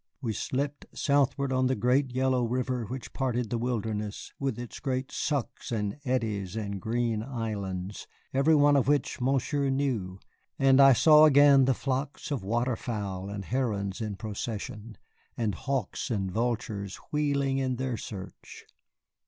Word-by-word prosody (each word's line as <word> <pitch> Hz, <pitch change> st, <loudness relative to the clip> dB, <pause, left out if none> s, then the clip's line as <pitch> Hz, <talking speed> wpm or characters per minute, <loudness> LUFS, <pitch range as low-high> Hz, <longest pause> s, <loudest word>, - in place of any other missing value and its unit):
We 115 Hz, -5 st, -2 dB
slipped 140 Hz, +6 st, -3 dB
southward 140 Hz, -1 st, +2 dB
on 130 Hz, 0 st, +2 dB
the 130 Hz, -, +1 dB
great, 125 Hz, +5 st, +2 dB
yellow 130 Hz, 0 st, +1 dB
river 125 Hz, 0 st, -1 dB
which 130 Hz, +4 st, -7 dB
parted 125 Hz, -4 st, -1 dB
the 120 Hz, -, 0 dB
wilderness, 110 Hz, -3 st, -3 dB
with 135 Hz, -4 st, -1 dB
its 120 Hz, -1 st, -7 dB, 0.3 s
sucks 140 Hz, -5 st, -2 dB
and 105 Hz, +3 st, -2 dB
eddies 110 Hz, -, -1 dB
and 100 Hz, -3 st, -4 dB
green 115 Hz, 0 st, 0 dB
islands, 105 Hz, -6 st, -4 dB, 0.3 s
every 140 Hz, +4 st, +4 dB
one 145 Hz, 0 st, +5 dB
of 135 Hz, -2 st, +3 dB
which 145 Hz, -3 st, +1 dB
Monsieur 135 Hz, +2 st, +1 dB
knew, 120 Hz, -9 st, -1 dB, 0.4 s
and 135 Hz, 0 st, +5 dB
I 135 Hz, -1 st, +9 dB
saw 155 Hz, +4 st, +7 dB
again 140 Hz, -2 st, +7 dB
the 130 Hz, -1 st, +2 dB
flocks 135 Hz, +3 st, -3 dB
of 140 Hz, -, -1 dB
water 120 Hz, +5 st, 0 dB
fowl 100 Hz, -6 st, -4 dB
and 100 Hz, -1 st, -5 dB
herons 105 Hz, -6 st, -1 dB
in 105 Hz, -2 st, -3 dB
procession, 105 Hz, +1 st, -6 dB, 0.4 s
and 110 Hz, -4 st, 0 dB
hawks 130 Hz, +3 st, -3 dB
and 95 Hz, -5 st, -1 dB
vultures 105 Hz, -3 st, -2 dB, 0.2 s
wheeling 140 Hz, -2 st, +1 dB
in 130 Hz, -1 st, 0 dB
their 130 Hz, -1 st, -2 dB
search. 95 Hz, -3 st, -9 dB
125 Hz, 145 wpm, -28 LUFS, 105-135 Hz, 0.4 s, I